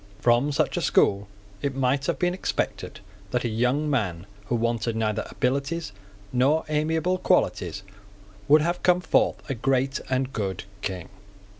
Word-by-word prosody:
From 120 +6 +3
such 140 - 0
a - - 0
school 100 0 +3 0.3
it 140 -2 -2
might 135 +1 +1
have - - 0
been 180 -1 +1
expected 185 - -3 0.3
that 125 0 -1
a - - 0
young 125 +7 +1
man 100 - -1 0.2
who 120 - 0
wanted 115 -1 0
neither 110 -2 -1
abilities 140 +5 -1 0.4
nor 140 +6 +3
amiable 160 +4 +1
qualities 100 - +1 0.6
would 150 +1 +6
have 175 +2 -1
come 180 0 +4
forth 160 - +1
a 135 - -1
great 135 +2 0
and 130 0 0
good 95 -4 -3 0.2
King. 95 -3 -4
130 Hz, 150 wpm, -25 LUFS, 115-150 Hz, 0.6 s, would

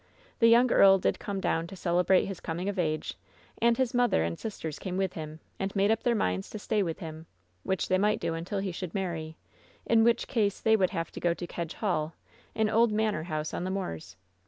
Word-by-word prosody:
The 230 - +6
young 235 +2 +5
earl 195 0 +7
did 185 - 0
come 200 -1 -4
down 165 -3 0
to 195 - -9
celebrate 180 +1 +2
his 195 -2 -6
coming 175 +3 -4
of 200 -2 -2
age, 155 -2 -1 0.5
and 235 0 +4
his 260 -2 0
mother 245 - +3
and 85 0 -3
sisters 160 -8 -5
came 185 -1 -4
with 190 -1 0
him, 155 -1 -7 0.2
and 195 +1 -3
made 200 +2 +3
up 225 - +1
their 240 -1 +2
minds 90 - -1
to - - -6
stay 210 0 0
with 165 -4 -2
him, 160 0 -8 0.3
which 190 - -1
they 185 0 +2
might 210 +2 +2
do 165 - -2
until 170 +5 -4
he 195 -1 -2
should 175 0 -6
marry, 165 -5 -3 0.5
in 225 -1 +4
which 235 0 +2
case 205 -5 0
they 220 0 +4
would 190 -4 +2
have 165 0 -4
to - - -7
go 170 -1 +1
to 175 - -6
Kedge 170 -1 -5
Hall, 165 -7 -1 0.4
an 220 -1 +2
old 225 +1 +3
manor 210 -7 0
house 155 -2 -3
on - - -3
the 185 - -2
moors. 185 - -4
190 Hz, 230 wpm, -29 LUFS, 165-215 Hz, 0.5 s, earl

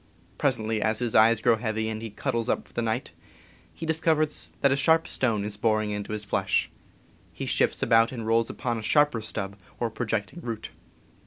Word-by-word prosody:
Presently, 110 -5 0
as 110 0 +1
his 120 -1 -1
eyes 110 +1 +6
grow 120 -2 +4
heavy 110 -1 -2
and 110 0 -4
he 115 - -5
cuddles 115 +1 -2
up - - -1
for - - -23
the 120 - -1
night, 115 +2 -2 0.6
he 165 - -7
discovers 160 -1 +1
that 140 - +4
a - - +4
sharp 160 +4 +3
stone 110 -6 0
is 105 -1 -4
boring 110 -1 +1
into 105 +1 -4
his 105 -1 -3
flesh. - - 0 0.6
He - - -6
shifts - - +1
about, 115 0 +4
and 115 -4 -5
rolls 115 +1 +2
upon 120 -3 -3
a - - -6
sharper 145 +1 +3
stub 100 -2 -5 0.2
or 120 -2 -1
projecting 115 +7 -3
root. 115 -6 -5
115 Hz, 190 wpm, -26 LUFS, 110-130 Hz, 0.6 s, eyes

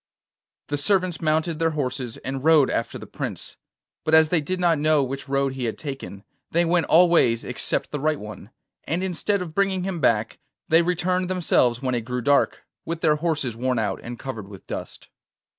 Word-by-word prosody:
The 145 0 0
servants 185 +2 +1
mounted 160 +1 0
their 165 0 +2
horses 125 -4 -3
and 135 0 -5
rode 155 -4 +5
after 115 - -2
the - - -9
Prince; - - -5 0.5
but 160 0 +3
as 160 -1 +6
they 170 -2 +2
did 185 +5 -3
not 170 -4 +3
know 155 -1 +3
which 135 +1 -5
road 135 -1 +1
he 130 -2 -3
had 115 - -3
taken, 135 -9 -7 0.3
they 170 +1 +2
went 170 -1 +2
all 175 +2 +6
ways 120 -9 +3
except 125 - -2
the 150 - -3
right 155 +1 0
one, 105 -1 -9 0.4
and 170 +5 -1
instead 190 +1 -1
of 165 -3 -9
bringing 195 -1 +1
him 185 -2 -3
back 135 - +1 0.3
they 165 +1 +5
returned 180 +1 0
themselves 135 -9 +2
when 130 -1 0
it 120 - 0
grew 125 +2 -4
dark, 140 +4 +2 0.2
with 165 0 -4
their 155 -2 +3
horses 150 -7 -1
worn 125 +1 -1
out 105 -4 -1
and 120 0 -7
covered 115 -7 -6
with 100 -2 -12
dust. - - -7
150 Hz, 195 wpm, -24 LUFS, 125-170 Hz, 0.5 s, as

